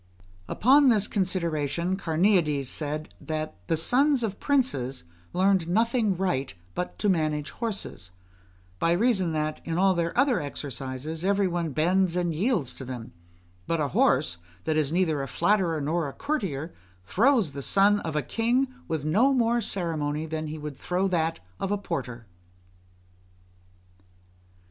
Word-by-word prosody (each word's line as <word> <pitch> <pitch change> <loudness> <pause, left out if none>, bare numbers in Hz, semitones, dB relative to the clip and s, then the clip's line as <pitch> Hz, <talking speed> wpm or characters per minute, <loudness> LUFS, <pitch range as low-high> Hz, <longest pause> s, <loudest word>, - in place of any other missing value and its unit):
Upon 275 - +5
this 215 -4 +3
consideration 170 -3 -1
Carneades 165 -5 +2
said, 150 +3 -3
that 155 0 -3
"the 165 - +1
sons 260 - +3
of 205 -3 -3
princes 145 - 0 0.3
learned 185 -2 +2
nothing 225 0 +2
right 140 - -1 0.2
but 180 - -4
to 210 - 0
manage 155 -5 0
horses; 210 - -5 0.7
by 165 - +3
reason 190 -3 +2
that, 155 0 -2
in 165 0 -3
all 190 +1 +4
their 170 +1 -2
other 265 -3 +3
exercises, 140 +2 -5
every 200 0 +2
one 170 -2 -1
bends 175 +4 +2
and 175 -2 0
yields 180 - 0
to - - -8
them; 125 -3 -7 0.5
but 165 - 0
a 145 -2 0
horse, 85 -7 +2 0.2
that 155 - 0
is 155 -2 +1
neither 165 -4 +1
a 135 - -4
flatterer 170 - +1
nor 155 +1 -1
a - - -10
courtier, 190 - -3 0.3
throws 215 - +3
the 140 0 -6
son 200 +7 +4
of 160 -5 -5
a 150 - +1
king 245 +4 +1 0.2
with 155 -3 -2
no 220 - +4
more 235 -1 +2
ceremony 160 -7 -2
than 155 0 -4
he 155 +1 -5
would 150 -2 -6
throw 180 +5 0
that 165 - 0 0.2
of 195 - -2
a 205 - +2
porter." 125 - -5
170 Hz, 150 wpm, -26 LUFS, 150-200 Hz, 0.7 s, Upon